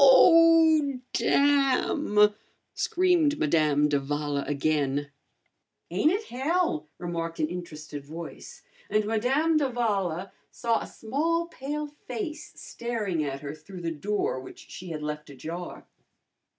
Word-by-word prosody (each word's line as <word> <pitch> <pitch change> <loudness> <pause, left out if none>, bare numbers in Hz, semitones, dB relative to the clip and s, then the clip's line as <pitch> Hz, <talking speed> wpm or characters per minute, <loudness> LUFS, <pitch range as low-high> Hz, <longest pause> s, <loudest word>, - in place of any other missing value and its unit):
"Oh! 320 -1 +6
Damn!" 275 -6 +3 0.4
screamed 345 -5 +2
Madame 150 -1 +3
d'Avala 145 0 -1
again. 145 -1 0 0.8
"Ain't 310 - +3
it 405 +4 -1
hell?" 270 - -1
remarked 165 -1 -4
an 155 - +2
interested 155 -4 -7
voice, 160 +4 -9 0.3
and 215 0 +2
Madame 265 +9 +2
d'Avala 205 - -1 0.2
saw 230 -1 0
a - - -6
small 320 +9 -1
pale 295 +1 -4 0.2
face 310 -7 -5
staring 215 -9 -3
at 140 -1 -4
her 145 -1 -5
through 175 +4 -11
the 165 -1 -2
door 180 -2 -1
which 130 - -12
she 180 - -8
had 155 -2 -5
left 150 0 -5
ajar. 165 +6 -7
200 Hz, 115 wpm, -27 LUFS, -, 0.8 s, Oh